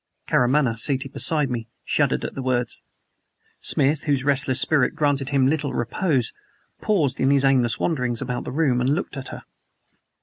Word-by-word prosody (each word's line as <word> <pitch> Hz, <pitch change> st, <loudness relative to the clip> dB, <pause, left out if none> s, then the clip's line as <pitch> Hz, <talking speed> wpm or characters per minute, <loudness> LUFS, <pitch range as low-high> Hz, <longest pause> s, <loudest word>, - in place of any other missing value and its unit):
Karamaneh, 125 Hz, -2 st, +1 dB
seated 135 Hz, +2 st, +1 dB
beside 150 Hz, -5 st, +3 dB
me, 115 Hz, -2 st, -4 dB, 0.2 s
shuddered -, -, 0 dB
at -, -, -5 dB
the 135 Hz, -, -6 dB
words. 125 Hz, -2 st, -2 dB, 0.8 s
Smith, 145 Hz, +2 st, 0 dB
whose 140 Hz, -3 st, 0 dB
restless 135 Hz, -2 st, +2 dB
spirit 145 Hz, -5 st, +2 dB
granted 145 Hz, -2 st, 0 dB
him 135 Hz, -2 st, +2 dB
little 145 Hz, 0 st, -1 dB
repose, 125 Hz, +1 st, -1 dB, 0.5 s
paused 165 Hz, -11 st, 0 dB
in 135 Hz, -, +2 dB
his 140 Hz, -1 st, +3 dB
aimless 125 Hz, -4 st, +2 dB
wanderings 125 Hz, -8 st, -1 dB
about 125 Hz, 0 st, -4 dB
the -, -, -6 dB
room 135 Hz, -4 st, +1 dB
and 135 Hz, +4 st, +1 dB
looked 175 Hz, -, -5 dB
at 135 Hz, -1 st, -7 dB
her. -, -, -9 dB
135 Hz, 165 wpm, -22 LUFS, 125-145 Hz, 0.8 s, beside